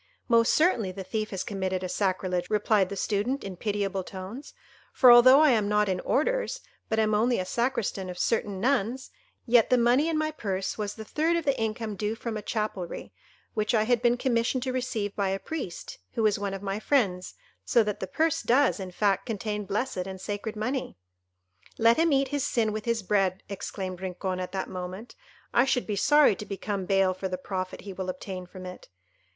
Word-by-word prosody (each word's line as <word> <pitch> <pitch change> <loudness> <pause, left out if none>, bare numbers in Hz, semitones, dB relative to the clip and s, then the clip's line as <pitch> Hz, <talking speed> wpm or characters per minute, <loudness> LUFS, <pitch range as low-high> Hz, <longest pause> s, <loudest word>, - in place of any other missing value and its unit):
"Most 230 -1 +4
certainly 275 - +2
the 190 +1 -7
thief 215 +3 -3
has 190 -2 -3
committed 190 -2 -2
a - - -2
sacrilege," 185 -2 -1
replied 210 -2 +2
the 200 - -5
Student, 215 +7 -1
in 195 -2 -6
pitiable 200 -1 -2
tones; 195 +10 -8 0.4
"for 250 - +7
although 255 +4 +8
I 305 -3 +6
am 215 -4 +2
not 210 0 +2
in 185 -1 0
orders, - - 0 0.3
but 220 - 0
am 215 -1 +2
only 235 +3 +2
a 185 - -2
Sacristan 230 -4 -1
of 180 - -7
certain 205 -3 0
nuns, 255 +1 0 0.3
yet 235 -2 +4
the 250 - +4
money 245 +6 +3
in 320 - 0
my 310 0 0
purse 195 -9 -3
was 205 -1 -4
the 220 - -8
third 320 +8 +1
of 335 - -3
the 275 - +2
income 220 -1 -2
due 210 +2 -2
from 230 -1 -5
a 215 - -3
chapelry, 210 -6 -4 0.4
which 215 +2 0
I 215 - +3
had 235 +1 +2
been 240 0 +3
commissioned 245 0 0
to 260 -1 -2
receive 230 -6 -2
by 200 -2 0
a 195 - 0
priest, 265 - -6
who 225 - 0
is 210 -2 +2
one 200 -1 -2
of 195 - -8
my 195 +1 -2
friends, 200 -9 0 0.3
so 235 - +3
that 210 -1 -3
the 190 - -4
purse 320 - +1
does, 260 0 +3
in 190 -1 -5
fact, 195 +1 0
contain 210 -2 -3
blessed 200 -3 -2
and 190 0 -7
sacred 205 +3 -4
money." 250 - -3 0.8
"Let 230 +1 +5
him 330 0 +3
eat 275 -1 +2
his 285 -2 -1
sin 225 -3 +1
with 215 0 -4
his 230 -2 0
bread," 190 -1 +1
exclaimed 190 -2 -5
Rincon 185 0 -3
at 185 - -4
that 190 -1 -3
moment; 185 +5 -7 0.4
"I 240 - +5
should 250 -2 +1
be 210 - -2
sorry 295 +2 +5
to 210 - -7
become 195 -1 -3
bail 195 -1 +3
for 190 +1 -4
the 185 -1 -3
profit 185 0 -5
he 200 -1 -8
will 185 0 -4
obtain 185 0 -6
from 185 0 -10
it. 180 0 -10
210 Hz, 205 wpm, -27 LUFS, 190-240 Hz, 0.8 s, although